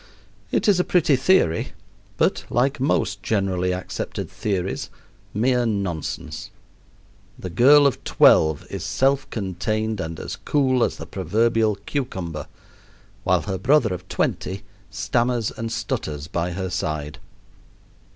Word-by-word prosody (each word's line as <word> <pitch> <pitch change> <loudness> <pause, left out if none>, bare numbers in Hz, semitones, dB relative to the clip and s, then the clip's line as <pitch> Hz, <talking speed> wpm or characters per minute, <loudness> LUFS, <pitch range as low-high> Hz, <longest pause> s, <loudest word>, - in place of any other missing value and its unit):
It - - +1
is 200 -3 +5
a - - +4
pretty 165 -6 +3
theory, 130 - +2 0.4
but, - - +1
like 130 +4 +1
most 115 -7 0
generally 95 -4 0
accepted 90 0 -4
theories, 95 -3 -2 0.4
mere 125 +3 +2
nonsense. 85 -6 -3 0.9
The 90 - -6
girl 140 +9 +6
of 140 - +1
twelve 80 -2 +4
is - - -4
self 135 +1 +1
contained 110 +2 -2
and 80 -1 -4
as - - -6
cool 130 -4 +2
as - - 0
the - - -7
proverbial 110 +3 +1
cucumber, 90 - -4 0.8
while - - +2
her 95 -3 -3
brother 125 -3 +3
of 90 +1 -8
twenty 95 +1 -2 0.3
stammers 120 +3 0
and 115 0 -5
stutters 115 - -3
by 85 +1 -2
her 95 0 -3
side. 75 -3 -3
105 Hz, 125 wpm, -23 LUFS, 90-125 Hz, 0.9 s, girl